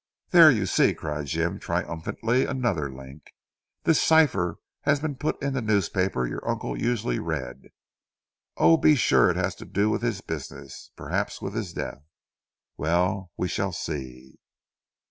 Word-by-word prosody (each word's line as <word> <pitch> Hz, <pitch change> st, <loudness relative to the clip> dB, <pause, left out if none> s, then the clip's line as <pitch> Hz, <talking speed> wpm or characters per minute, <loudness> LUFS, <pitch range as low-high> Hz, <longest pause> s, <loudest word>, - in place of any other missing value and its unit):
"There 170 Hz, -3 st, +9 dB
you 110 Hz, -9 st, +2 dB
see!" 90 Hz, -, +3 dB
cried 75 Hz, -1 st, -4 dB
Jim 85 Hz, +6 st, -1 dB
triumphantly, 100 Hz, +8 st, -1 dB
"another 110 Hz, -, -1 dB
link. 65 Hz, +3 st, -13 dB, 0.5 s
This 165 Hz, -, +3 dB
cipher 140 Hz, -, +3 dB, 0.2 s
has 140 Hz, 0 st, +2 dB
been 150 Hz, 0 st, -2 dB
put 150 Hz, +4 st, -2 dB
in 140 Hz, -1 st, -1 dB
the 135 Hz, -, -1 dB
newspaper 95 Hz, -, 0 dB
your -, -, -5 dB
uncle -, -, -2 dB
usually 115 Hz, -, -1 dB
read. -, -, -5 dB, 0.9 s
Oh, 165 Hz, -, +6 dB
be 155 Hz, -1 st, +5 dB
sure 125 Hz, -, +4 dB
it -, -, 0 dB
has -, -, 0 dB
to -, -, -10 dB
do 105 Hz, +2 st, +1 dB
with -, -, -1 dB
his 115 Hz, -5 st, -2 dB
business 70 Hz, -4 st, -8 dB
perhaps -, -, -3 dB
with 95 Hz, -, -5 dB
his 110 Hz, -6 st, -3 dB
death. 70 Hz, -, -5 dB, 0.8 s
Well, 90 Hz, +4 st, 0 dB
we 90 Hz, -, -1 dB
shall 95 Hz, +1 st, -2 dB
see." 65 Hz, -5 st, -6 dB
95 Hz, 150 wpm, -26 LUFS, 80-120 Hz, 0.9 s, There